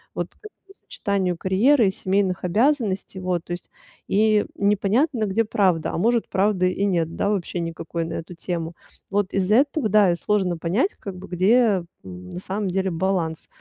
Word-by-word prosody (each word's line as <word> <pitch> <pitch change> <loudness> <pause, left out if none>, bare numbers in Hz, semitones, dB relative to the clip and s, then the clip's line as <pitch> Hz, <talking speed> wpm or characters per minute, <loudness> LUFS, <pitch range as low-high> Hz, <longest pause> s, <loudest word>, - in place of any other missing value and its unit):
вот - - -3
к - - -34
этому 410 -2 -16
сочетанию 190 - -2
карьеры 220 +6 +3
и - - +2
семейных 190 -1 -1
обязанностей, 205 - 0
вот 180 -2 -2
то - - -10
есть, 175 0 -6 0.4
и 215 +1 +3
непонятно, 215 +6 +1
где 210 +3 +1
правда. 185 -6 +1
А, - - -3
может, 230 +5 +1
правда 190 -1 +1
и 190 +2 0
нет, 170 -4 0
да, 200 - 0
вообще 185 -3 -2
никакой 165 0 -4
на 165 - -5
эту 165 +2 -6
тему, 170 -1 -4 0.4
вот 205 -1 0
из 195 0 0
этого, 275 +1 +3
да, 205 -3 +5
и - - +1
сложно 185 -1 0
понять 185 - 0
как 195 -2 -7
бы, 185 +1 -10
где, 200 +2 +3 0.2
м, 90 -1 -10
на - - -6
самом 195 +2 -3
деле 190 +1 0
баланс. 165 -2 -1
190 Hz, 180 wpm, -23 LUFS, 175-210 Hz, 0.4 s, да